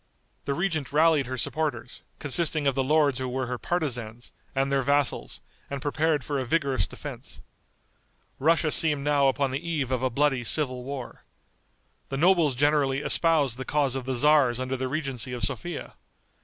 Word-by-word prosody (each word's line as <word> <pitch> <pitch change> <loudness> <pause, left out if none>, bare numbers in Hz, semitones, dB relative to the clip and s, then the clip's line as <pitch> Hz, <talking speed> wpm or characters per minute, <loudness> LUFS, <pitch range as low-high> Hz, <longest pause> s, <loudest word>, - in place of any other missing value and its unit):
The 140 - -1
regent 165 -5 -2
rallied 155 -2 +3
her 130 0 -4
supporters, 140 -3 -3 0.2
consisting 155 +1 0
of 140 - +3
the 135 +1 0
lords 145 -2 +2
who 130 -1 -3
were 130 +1 -2
her 125 0 -4
partisans, 120 -9 -3 0.2
and 135 +1 0
their 135 0 +2
vassals, 140 0 0 0.3
and 140 - -4
prepared 150 +1 0
for 145 -2 -2
a - - -1
vigorous 135 - 0
defense. - - -9 1.0
Russia 155 +1 +2
seemed 150 -3 +3
now 145 -1 +3
upon 135 0 +1
the 135 - -2
eve 155 -6 -2
of 130 -1 0
a 130 - +1
bloody 135 0 +1
civil 130 -1 -1
war. 135 -2 -7 0.9
The 135 - -3
nobles 170 -4 +3
generally 140 0 +2
espoused 150 -7 +2
the - - -3
cause 140 -1 0
of 135 -2 -4
the 130 0 -2
tzars 140 -2 +4
under 130 +1 -2
the 130 0 -2
regency 135 -3 -3
of 120 -3 -4
Sophia. 170 +10 -4
140 Hz, 170 wpm, -26 LUFS, 130-150 Hz, 1.0 s, tzars